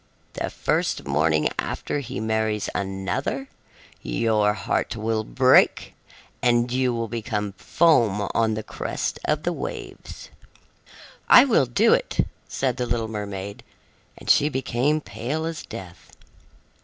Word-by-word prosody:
The -, -, -3 dB
first -, -, -1 dB
morning 75 Hz, +2 st, +2 dB
after -, -, -2 dB
he 120 Hz, -7 st, -5 dB
marries 110 Hz, -1 st, -1 dB
another, 100 Hz, +8 st, -3 dB, 0.5 s
your 105 Hz, -, +1 dB
heart 100 Hz, +2 st, -2 dB
will 110 Hz, 0 st, -1 dB
break 130 Hz, +3 st, +3 dB, 0.5 s
and 120 Hz, 0 st, +2 dB
you 130 Hz, 0 st, +1 dB
will 115 Hz, -1 st, -2 dB
become 105 Hz, -2 st, -3 dB
foam 110 Hz, -, +2 dB
on 110 Hz, -1 st, +2 dB
the 110 Hz, -, -4 dB
crest -, -, -4 dB
of 150 Hz, 0 st, 0 dB
the 175 Hz, -, 0 dB
waves." -, -, -7 dB, 1.0 s
"I -, -, +9 dB
will 220 Hz, -, +3 dB
do 120 Hz, -, +4 dB
it," -, -, +1 dB, 0.2 s
said 130 Hz, -3 st, -1 dB
the 125 Hz, -, -2 dB
little 115 Hz, -2 st, -1 dB
mermaid, 100 Hz, -2 st, -5 dB, 0.6 s
and -, -, -13 dB
she 145 Hz, -, +5 dB
became 135 Hz, +2 st, 0 dB
pale 125 Hz, +9 st, -4 dB
as 165 Hz, -2 st, -4 dB
death. 95 Hz, -6 st, -10 dB
115 Hz, 130 wpm, -24 LUFS, 105-130 Hz, 1.0 s, I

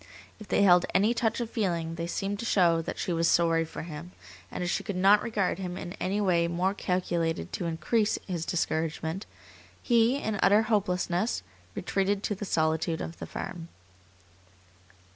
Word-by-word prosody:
If 215 Hz, -, -11 dB
they 200 Hz, -, +2 dB
held 175 Hz, -2 st, +6 dB
any 210 Hz, +5 st, +4 dB
touch 225 Hz, -1 st, 0 dB
of 230 Hz, -1 st, -4 dB
feeling 170 Hz, -7 st, -1 dB
they 170 Hz, 0 st, -4 dB
seemed 200 Hz, +3 st, -3 dB
to -, -, -4 dB
show 170 Hz, -7 st, +3 dB
that -, -, -5 dB
she 175 Hz, -, -2 dB
was 165 Hz, 0 st, +2 dB
sorry 165 Hz, -1 st, +3 dB
for 160 Hz, -, -7 dB
him, 170 Hz, +2 st, -8 dB, 0.4 s
and -, -, -4 dB
as 175 Hz, -, -1 dB
she -, -, -1 dB
could 200 Hz, -, -4 dB
not 195 Hz, +3 st, +5 dB
regard 200 Hz, -5 st, -1 dB
him 180 Hz, -1 st, -4 dB
in 175 Hz, -, -6 dB
any 195 Hz, +3 st, -1 dB
way 175 Hz, -4 st, +2 dB
more 180 Hz, +3 st, 0 dB
calculated 170 Hz, -, -1 dB
to 175 Hz, -, -2 dB
increase 205 Hz, +7 st, +1 dB
his 175 Hz, -4 st, -3 dB
discouragement, 165 Hz, +1 st, -2 dB, 0.5 s
he, 235 Hz, +1 st, +3 dB
in 220 Hz, -7 st, -3 dB
utter 205 Hz, +3 st, +5 dB
hopelessness, 190 Hz, -, 0 dB, 0.3 s
retreated 195 Hz, +2 st, 0 dB
to -, -, 0 dB
the 205 Hz, +1 st, -5 dB
solitude 160 Hz, -1 st, 0 dB
of 165 Hz, -, -6 dB
the -, -, -6 dB
farm. 170 Hz, -2 st, -6 dB
180 Hz, 175 wpm, -28 LUFS, 165-205 Hz, 0.5 s, held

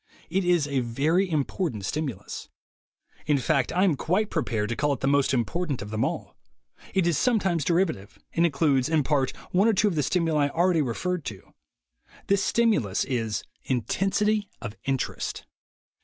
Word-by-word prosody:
It 190 Hz, +2 st, +1 dB
is 175 Hz, -4 st, +2 dB
a 140 Hz, -2 st, 0 dB
very 150 Hz, +11 st, +1 dB
important 145 Hz, -, -1 dB
stimulus. 135 Hz, -7 st, -4 dB, 0.8 s
In 150 Hz, -, +3 dB
fact, 135 Hz, -1 st, +1 dB
I 185 Hz, -, +2 dB
am 190 Hz, -5 st, +4 dB
quite 190 Hz, +10 st, 0 dB
prepared 110 Hz, -, -1 dB
to 120 Hz, -, -1 dB
call 145 Hz, +2 st, +1 dB
it 135 Hz, -, -5 dB
the 135 Hz, -, +1 dB
most 140 Hz, -1 st, +3 dB
important 140 Hz, +4 st, -1 dB
of 105 Hz, -, -9 dB
them 110 Hz, +1 st, 0 dB
all. -, -, -3 dB, 0.6 s
It 190 Hz, -3 st, +3 dB
is 170 Hz, -3 st, +2 dB
sometimes 195 Hz, -, +2 dB
derivative; 165 Hz, -, 0 dB, 0.2 s
and 165 Hz, -, +2 dB
includes, 140 Hz, -4 st, +2 dB
in 160 Hz, -2 st, +2 dB
part, 135 Hz, -2 st, +1 dB, 0.2 s
one 195 Hz, +4 st, +4 dB
or 225 Hz, -, +4 dB
two 210 Hz, +1 st, +3 dB
of -, -, -3 dB
the 155 Hz, -, +1 dB
stimuli 155 Hz, -1 st, +1 dB
already 170 Hz, +2 st, +2 dB
referred 165 Hz, +7 st, -2 dB
to. 100 Hz, -3 st, -8 dB, 0.7 s
This 200 Hz, 0 st, +2 dB
stimulus 180 Hz, -, +2 dB
is 115 Hz, -6 st, -2 dB, 0.2 s
intensity 195 Hz, -, 0 dB
of 110 Hz, -1 st, -6 dB
interest. 135 Hz, -2 st, -2 dB
150 Hz, 165 wpm, -26 LUFS, 130-180 Hz, 0.8 s, am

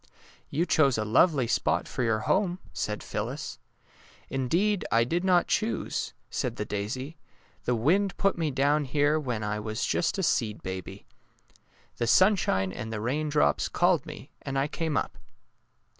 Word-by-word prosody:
'' -, -, -28 dB
You 170 Hz, -, +3 dB
chose 140 Hz, -8 st, +3 dB
a 110 Hz, -, -1 dB
lovely 135 Hz, +5 st, +4 dB
spot 115 Hz, -, 0 dB
for -, -, -4 dB
your 110 Hz, -2 st, +1 dB
home," 185 Hz, -, +1 dB, 0.2 s
said -, -, -3 dB
Phyllis. -, -, -4 dB, 0.4 s
'' -, -, -28 dB, 0.3 s
Indeed, 175 Hz, +10 st, +1 dB
I 115 Hz, +1 st, +4 dB
did 170 Hz, +9 st, -1 dB
not 180 Hz, -2 st, +4 dB
choose," 220 Hz, +2 st, -1 dB, 0.2 s
said -, -, -2 dB
the -, -, -3 dB
daisy, 130 Hz, +10 st, -4 dB, 0.4 s
^^ -, -, -36 dB
the 125 Hz, -, +2 dB
wind 180 Hz, -, +2 dB
put 195 Hz, 0 st, +2 dB
me 165 Hz, -3 st, -1 dB
down 145 Hz, +2 st, +2 dB
here 145 Hz, +3 st, +2 dB
when 125 Hz, -7 st, -3 dB
I 105 Hz, 0 st, -2 dB
was 110 Hz, +2 st, -3 dB
just 175 Hz, -, 0 dB
a 190 Hz, -, -1 dB
seed 110 Hz, -9 st, 0 dB
baby. 95 Hz, -1 st, -6 dB, 0.9 s
The 120 Hz, -, -1 dB
sunshine 140 Hz, -, +3 dB
and 110 Hz, 0 st, -6 dB
the 110 Hz, -, -3 dB
rain 145 Hz, +8 st, -1 dB
drops 75 Hz, -, +2 dB
called -, -, +2 dB
me, -, -, -10 dB
and 135 Hz, 0 st, -4 dB
I 135 Hz, +1 st, +1 dB
came 160 Hz, -1 st, -2 dB
up." -, -, -3 dB
135 Hz, 175 wpm, -28 LUFS, 110-170 Hz, 0.9 s, lovely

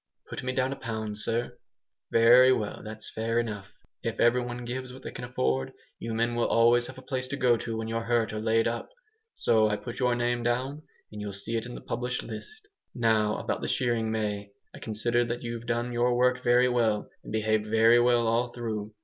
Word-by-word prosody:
"Put -, -, -4 dB
me 130 Hz, -, -2 dB
down 130 Hz, +1 st, 0 dB
a -, -, -6 dB
pound, 110 Hz, -3 st, -5 dB
sir." 115 Hz, +2 st, -2 dB, 0.5 s
"Very 120 Hz, +3 st, +7 dB
well, 105 Hz, -5 st, -1 dB
that's 110 Hz, 0 st, -8 dB
fair 115 Hz, +1 st, 0 dB
enough. 105 Hz, -4 st, -4 dB, 0.3 s
If 115 Hz, -, -3 dB
every 120 Hz, +1 st, +4 dB
one 120 Hz, 0 st, -5 dB
gives 125 Hz, +1 st, -5 dB
what 130 Hz, +1 st, -12 dB
they -, -, -6 dB
can 125 Hz, -, -6 dB
afford, 65 Hz, -, -1 dB, 0.3 s
you 115 Hz, -1 st, -4 dB
men 115 Hz, +1 st, +1 dB
will 120 Hz, 0 st, +1 dB
always 120 Hz, +1 st, +4 dB
have -, -, -10 dB
a 130 Hz, -, -11 dB
place 130 Hz, -1 st, -3 dB
to 140 Hz, +2 st, -4 dB
go 125 Hz, -3 st, +4 dB
to 115 Hz, 0 st, -4 dB
when 110 Hz, 0 st, -3 dB
you're 115 Hz, 0 st, -2 dB
hurt 115 Hz, -2 st, +1 dB
or 110 Hz, -, -3 dB
laid 115 Hz, +1 st, +2 dB
up. 115 Hz, 0 st, -3 dB, 0.5 s
So 110 Hz, -1 st, +3 dB
I 105 Hz, -, +1 dB
put 120 Hz, +3 st, -7 dB
your 125 Hz, -2 st, +2 dB
name 120 Hz, 0 st, 0 dB
down, 130 Hz, +5 st, -1 dB, 0.3 s
and 105 Hz, 0 st, -7 dB
you'll 105 Hz, -1 st, -5 dB
see 100 Hz, +4 st, -4 dB
it 115 Hz, +1 st, -2 dB
in 125 Hz, -, -8 dB
the -, -, -8 dB
published 125 Hz, +2 st, -3 dB
list. 430 Hz, 0 st, -9 dB, 0.3 s
Now 110 Hz, -3 st, +2 dB
about -, -, -3 dB
the -, -, -2 dB
shearing, 120 Hz, -3 st, 0 dB
May. 105 Hz, -2 st, -2 dB, 0.2 s
I -, -, -10 dB
consider 120 Hz, +2 st, 0 dB
that 120 Hz, +1 st, -4 dB
you've 120 Hz, 0 st, -5 dB
done 120 Hz, +1 st, -1 dB
your 120 Hz, +1 st, +2 dB
work 125 Hz, 0 st, +2 dB
very 125 Hz, +1 st, +5 dB
well, 115 Hz, -4 st, +1 dB, 0.2 s
and -, -, -9 dB
behaved 110 Hz, 0 st, +1 dB
very 115 Hz, +2 st, +5 dB
well 120 Hz, -1 st, +3 dB
all 115 Hz, +2 st, +2 dB
through. 110 Hz, -3 st, -5 dB
120 Hz, 220 wpm, -28 LUFS, 110-125 Hz, 0.5 s, Very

